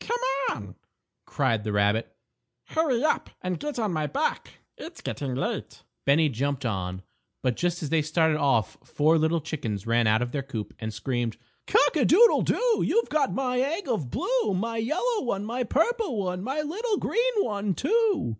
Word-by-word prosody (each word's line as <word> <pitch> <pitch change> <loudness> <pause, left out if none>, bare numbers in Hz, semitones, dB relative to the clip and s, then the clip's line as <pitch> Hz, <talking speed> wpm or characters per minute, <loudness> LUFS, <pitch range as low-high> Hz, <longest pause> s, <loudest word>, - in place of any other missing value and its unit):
"Come 480 +1 -1 0.3
on," 100 -4 -6 0.5
cried 115 -6 0
the 105 - -2
rabbit; 105 +2 +1 0.5
"hurry 290 -6 +1
up 310 - +1
and 180 -1 -2
get 295 -2 -4
on 215 -6 -1
my 155 -2 -1
back; 145 - -2 0.2
it's - - -10
getting 135 -3 -4
late." 135 - -4 0.2
Bennie 150 +3 +4
jumped 135 +2 -2
on, 95 -4 -3 0.4
but 125 -2 +1
just 175 -1 -1
as 150 - -3
they 165 -1 +3
started 160 0 +2
off 135 -7 +1
four 155 +2 +2
little 160 +2 +2
chickens 120 - -4
ran 115 0 +2
out 110 +3 +3
of 120 - -5
their 145 - -2
coop 120 -6 -6
and 110 -1 -4
screamed: 120 +1 -2 0.3
_Cock 290 +1 +3
a - - +4
doodle 460 +9 +6
doo! 480 -2 +1
You've 465 - +1
got 290 -3 +1
my 250 -2 0
egg 310 +8 -1
of 210 - -1
blue; - - 0
My 230 +4 -2
yellow 370 - 0
one, 205 -5 -2
my 240 +3 -2
purple 330 - 0
one, 180 -2 -2
My 270 +6 -1
little 415 +8 -1
green - - +1
one, 205 - 0
too! 425 - +1
180 Hz, 180 wpm, -26 LUFS, -, 0.5 s, doodle